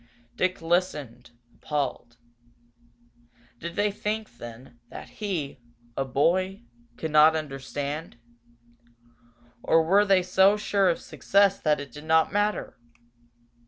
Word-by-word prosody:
Dick 185 -2 -1
listened, 165 -9 -1 0.2
appalled. 140 -5 -4 1.4
Did 170 +1 -6
they 205 0 +1
think, 210 - -4
then, 120 +1 -11
that - - -10
he, 170 -11 -3 0.4
a 135 - 0
boy, 185 - 0 0.3
could 160 - -4
not 155 +1 +6
understand? 145 0 -5 1.4
Or 165 0 +3
were 195 +5 +4
they 195 -3 +3
so 190 +3 +4
sure 200 -2 +2
of 170 - 0
success 200 0 +2
that 150 -2 +1
it 140 -2 -8
did 150 +5 -11
not 160 +2 +3
matter? 205 -6 -1
165 Hz, 115 wpm, -26 LUFS, 145-195 Hz, 1.4 s, not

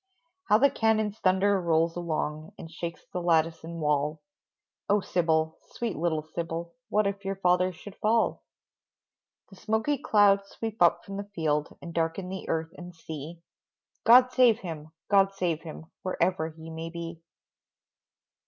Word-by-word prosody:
How 210 - +5
the 275 +4 +4
cannons' 220 -3 +1
thunder 190 +1 +3
rolls 165 -1 +2
along, 155 -2 -3
And 165 - -10
shakes 170 0 -6
the 180 - -2
lattice 165 -1 +2
and 165 +1 -7
wall, 150 0 0 0.7
Oh, 205 +1 +4
Sybil, 160 -4 0
sweet 235 -3 -3
little 160 -2 -1
Sybil, 165 +1 -5 0.2
What 210 0 +2
if 200 0 -2
your 195 0 -2
father 180 -1 +2
should 190 +3 -12
fall? 225 +1 +1 1.1
The 190 - -14
smoky 220 +8 0
clouds 200 -5 +4
sweep 225 -3 -6
up 175 - +4
from 195 -1 -6
the 200 0 -6
field 150 -2 -1
And 170 - -7
darken 165 +3 -1
the 190 0 -6
earth 160 0 -1
and 175 -1 -10
sea, 160 +1 -8 0.6
"God 250 +2 +7
save 245 -3 +4
him! 155 -4 -7 0.2
God 195 -1 +4
save 175 -5 -1
him!" 160 -1 -9 0.2
Wherever 180 -3 0
he 160 0 -11
may 160 +1 -5
be. 170 0 -7
175 Hz, 155 wpm, -28 LUFS, 160-200 Hz, 1.1 s, God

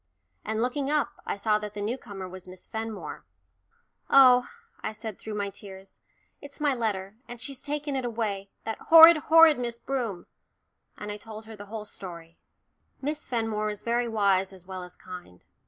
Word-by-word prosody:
and 220 +1 -1
looking 270 +2 -1
up, 300 0 0
I - - -1
saw 210 +1 +1
that 210 -1 -7
the - - -5
new 215 +4 -1
comer 195 -7 -8
was 185 0 -10
Miss 185 0 -11
Fenmore. 220 -1 -6 0.9
"Oh," 250 -2 +7 0.3
I 215 - -3
said 215 -1 -7
through 215 -1 -6
my 200 -1 -2
tears, 195 -1 -12 0.4
"it's 285 0 -11
my 295 -2 +2
letter, 210 -4 -3
and 240 0 -8
she's 270 +1 -5
taken 295 -1 -3
it 260 - -1
away 215 -4 -3
that 225 - -4
horrid, 330 0 +9
horrid 320 -1 +6
Miss 235 -1 -3
Broom." 235 -8 -3 0.7
And 210 0 -6
I 205 - -5
told 215 +1 -9
her 220 0 -10
the 205 0 -11
whole 215 0 -6
story. 170 -5 -10 0.6
Miss 295 +2 -4
Fenmore 225 -3 -1
was 210 -1 -5
very 240 +1 +1
wise 200 -4 +2
as 185 -2 -14
well 190 0 -6
as 180 0 -10
kind. 180 - -11
220 Hz, 180 wpm, -27 LUFS, 200-250 Hz, 0.9 s, horrid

